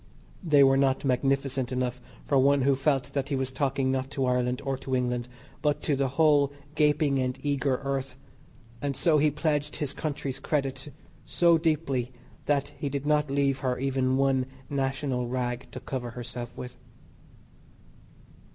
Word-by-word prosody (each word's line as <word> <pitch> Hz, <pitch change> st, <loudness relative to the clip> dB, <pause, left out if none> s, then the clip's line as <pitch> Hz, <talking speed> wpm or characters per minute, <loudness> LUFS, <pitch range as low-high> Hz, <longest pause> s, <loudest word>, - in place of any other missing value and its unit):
They 150 Hz, -5 st, +5 dB
were 135 Hz, 0 st, +5 dB
not 135 Hz, 0 st, +2 dB
magnificent 135 Hz, 0 st, 0 dB
enough 125 Hz, -1 st, -2 dB, 0.2 s
for 140 Hz, -, +3 dB
one 140 Hz, 0 st, +4 dB
who 140 Hz, +1 st, +4 dB
felt 135 Hz, -1 st, 0 dB
that 140 Hz, 0 st, -2 dB
he 140 Hz, -, 0 dB
was 130 Hz, -1 st, -1 dB
talking 135 Hz, 0 st, 0 dB
not 130 Hz, 0 st, -1 dB
to 135 Hz, -1 st, -1 dB
Ireland 125 Hz, 0 st, +1 dB
or 135 Hz, 0 st, 0 dB
to 130 Hz, -1 st, -2 dB
England, 125 Hz, -1 st, -1 dB, 0.3 s
but 150 Hz, -1 st, 0 dB
to 145 Hz, -, +1 dB
the 135 Hz, 0 st, +1 dB
whole 145 Hz, -3 st, +4 dB, 0.2 s
gaping 150 Hz, -2 st, +2 dB
and 130 Hz, 0 st, -1 dB
eager 140 Hz, -2 st, +1 dB
earth, 135 Hz, -1 st, -2 dB, 0.7 s
and 140 Hz, -1 st, -2 dB
so 160 Hz, -4 st, +3 dB
he 150 Hz, +1 st, +4 dB
pledged 150 Hz, -1 st, -1 dB
his 145 Hz, -2 st, -3 dB
country's 140 Hz, -3 st, -4 dB
credit 135 Hz, -1 st, -2 dB, 0.4 s
so 170 Hz, -2 st, +4 dB
deeply 145 Hz, -6 st, 0 dB, 0.4 s
that 145 Hz, -1 st, +1 dB
he 145 Hz, -, -2 dB
did 140 Hz, 0 st, -3 dB
not 150 Hz, -1 st, +2 dB
leave 140 Hz, -1 st, +1 dB
her 130 Hz, -2 st, -1 dB
even 130 Hz, -1 st, +1 dB
one 135 Hz, -1 st, +2 dB, 0.2 s
National 135 Hz, -2 st, -1 dB
rag 125 Hz, 0 st, -2 dB
to 130 Hz, -, -7 dB
cover 125 Hz, -1 st, -4 dB
herself 120 Hz, 0 st, -6 dB
with. 125 Hz, 0 st, -7 dB
135 Hz, 160 wpm, -27 LUFS, 130-145 Hz, 0.7 s, They